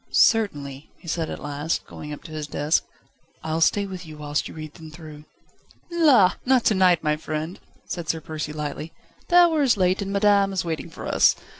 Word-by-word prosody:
"Certainly," 145 - +2
he - - -16
said 160 0 -2
at - - -5
last, 145 +2 -3
going 150 - -9
up 150 - -8
to 160 - -11
his 155 -1 -5
desk. 150 +2 0 0.6
"I'll 160 +1 -2
stay 200 +4 +3
with 185 -2 -7
you 155 -2 -11
whilst 150 0 -2
you - - -11
read 155 -1 -8
them 160 -3 -11
through." 155 -1 -11 0.7
"La! 270 - +5
not 255 -2 +3
to - - +4
night, 185 -4 +4
my 150 -1 +2
friend," 155 +3 -5 0.3
said 170 -2 -5
Sir 160 - 0
Percy 155 -1 -5
lightly; 150 +1 -5 0.3
"the 350 - +1
hour 340 -3 +6
is 255 -6 +3
late, 185 +1 +2
and 195 0 -3
madame 200 -1 +3
is 185 -2 -1
waiting 160 -2 -4
for - - -9
us. - - +4
165 Hz, 200 wpm, -24 LUFS, 150-200 Hz, 0.7 s, hour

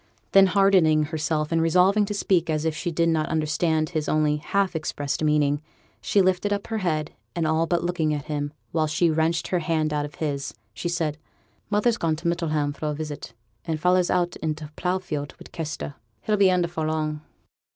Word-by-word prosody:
Then 195 0 +7
hardening 185 -6 +4
herself, 155 0 -1
and 165 0 +2
resolving 185 +5 +4
to 205 +1 -4
speak 175 -4 +1
as 155 0 0
if 160 -1 0
she 175 - -2
did 170 0 +1
not 160 -1 +1
understand 155 0 +1
his 155 -3 -2
only 150 -1 +2
half 195 +4 0
expressed 150 -2 -2
meaning, 150 -1 +2 0.4
she 200 - +3
lifted 185 +2 +1
up 200 0 -1
her 220 -1 -2
head, 155 -5 -1 0.2
and 170 -2 0
all 160 +1 +2
but 170 0 +1
looking 175 -3 0
at 145 -2 -2
him 145 -1 -3 0.2
while 160 -1 +1
she 160 +2 +2
wrenched 160 +1 0
her 180 - +1
hand 155 -2 0
out 145 0 0
of 145 - -10
his 145 -3 -3 0.2
she 175 +8 -3
said: 160 -3 -1 0.5
'Mother's 215 +3 +2
gone 165 -7 0
to 165 +2 -4
Middleham 155 -4 0
for 155 - -4
a 150 - -1
visit, 150 -5 -6 0.3
and 160 -2 -2
feyther's 180 +2 +3
out 175 -1 +1
i' 160 - 0
t' 155 0 -9
plough 180 +1 0
field 150 -6 -5
wi' - - -12
Kester; 155 -3 -5
but - - -32 0.3
he'll 215 - +2
be 200 -2 +5
in 180 -1 +2
afore 165 -2 -3
long.' 155 -1 -2
160 Hz, 205 wpm, -25 LUFS, 155-180 Hz, 0.5 s, Then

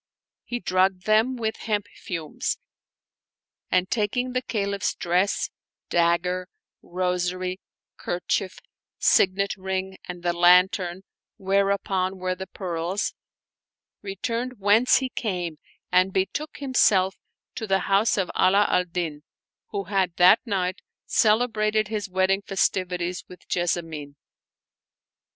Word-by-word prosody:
He 245 - -4
drugged 185 -2 +1
them 220 +4 +3
with 220 -2 -2
hemp 210 -3 -1
fumes; 165 -4 -4 1.1
and, 185 0 +2
taking 240 +4 -1
the 255 - 0
Ca 215 -5 -2
liph's 200 -1 -1
dress, 180 +3 0 0.4
dagger, 180 +2 +1 0.3
rosary, 180 +1 -2 0.4
kerchief, 185 +2 -2 0.4
signet 195 +1 +3
ring, 190 0 -4
and 175 -1 -8
the 175 -1 +1
lantern 180 +1 +4 0.3
whereupon 195 -1 0
were 185 0 -1
the 190 +1 -7
pearls, 180 +1 -3 0.9
returned 230 +5 -3
whence 205 +5 +4
he 260 -1 -1
came 180 -10 -3 0.3
and 185 +1 +4
betook 195 +12 -2
himself 205 -9 +3 0.4
to 220 - -5
the 195 -1 +2
house 200 +4 +2
of 190 -3 0
Ala 200 +2 +4
al 180 - +2
Din, 170 -4 -4 0.5
who 200 -1 -3
had 190 -4 0
that 180 +5 +7
night 190 -3 -1 0.3
celebrated 215 -1 +2
his 210 -2 -3
wedding 190 +1 +2
festivities 180 -2 -1
with 180 - -13
Jes 175 -1 +1
samine. 155 -4 -6
190 Hz, 115 wpm, -25 LUFS, 180-205 Hz, 1.1 s, that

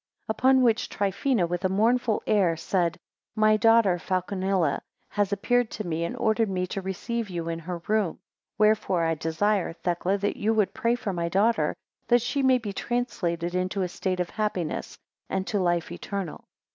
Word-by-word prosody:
6 - - -45
Upon 260 +3 +4
which 230 -2 +2
Trifina, 200 0 0
with 175 +2 -3
a 185 - +2
mournful 225 +3 +2
air, 185 -6 +2
said, 170 0 0 0.4
My 215 0 +4
daughter 225 -5 +4
Falconilla 185 -3 0 0.3
has 205 -1 0
appeared 245 +4 +1
to 215 - -5
me, 165 -1 -2
and - - -5
ordered 220 0 +1
me 185 -1 -1
to 195 - -2
receive 210 +4 -3
you 170 -2 -4
in 165 0 -3
her 170 0 -6
room; 210 -6 +1 0.4
wherefore 210 -4 +3
I 165 0 +2
desire, 165 +5 0
Thecla, 175 +3 -1
that 200 +1 -2
you 220 +2 +1
would 210 -3 +2
pray 240 -2 +1
for 210 -5 -3
my 170 -1 -1
daughter, 215 +6 +2 0.3
that 240 -1 +4
she 275 +3 -1
may 260 -1 +5
be 215 -5 -5
translated 180 -8 -2
into 185 +2 -1
a - - 0
state 185 +1 -3
of 180 - -2
happiness, 200 -7 -3 0.3
and 190 0 -1
to 205 - -1
life 175 -2 0
eternal. 195 -5 -5
195 Hz, 180 wpm, -26 LUFS, 175-220 Hz, 0.4 s, may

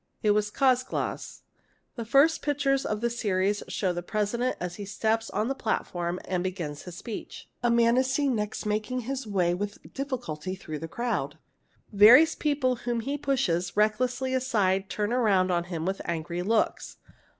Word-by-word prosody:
It 210 - +4
was 210 0 +1
Czolgosz. 255 +1 0 0.5
The 235 -3 -5
first 280 +7 +4
pictures 275 -2 +1
of 210 0 -2
the 235 - +1
series 205 -3 0
show 185 -3 -1
the 175 - -3
President 215 +6 -1
as 175 0 -5
he 205 - -6
steps 220 +3 -1
on 215 - -1
the 270 - 0
© - - -25
platform 175 -5 -2
and 180 -1 -1
begins 170 -6 -4
his 180 -2 -9
speech. 230 -4 -8
A 240 - +2
man 235 +1 +4
is 260 +1 +2
next 240 -8 -1
seen 210 - -3
making 215 +4 -2
his 260 0 -4
way 180 -4 +1
with 205 +3 -6
difficulty 235 - -4
through 155 -5 -7
the 165 - -5
crowd. 235 +7 -2 0.6
Various 245 +11 +8
people 280 -4 0
whom 240 -1 -2
he 275 +5 -2
pushes 185 -12 -1
reck 215 +1 +3
lessly 255 +1 -1
aside 195 -7 +1
turn 210 +1 -2
round 200 -7 +3
on 175 -1 0
him 170 -2 -4
with 190 +1 -2
angry 170 +1 -3
looks. 220 +4 0
215 Hz, 175 wpm, -27 LUFS, 185-255 Hz, 0.6 s, Various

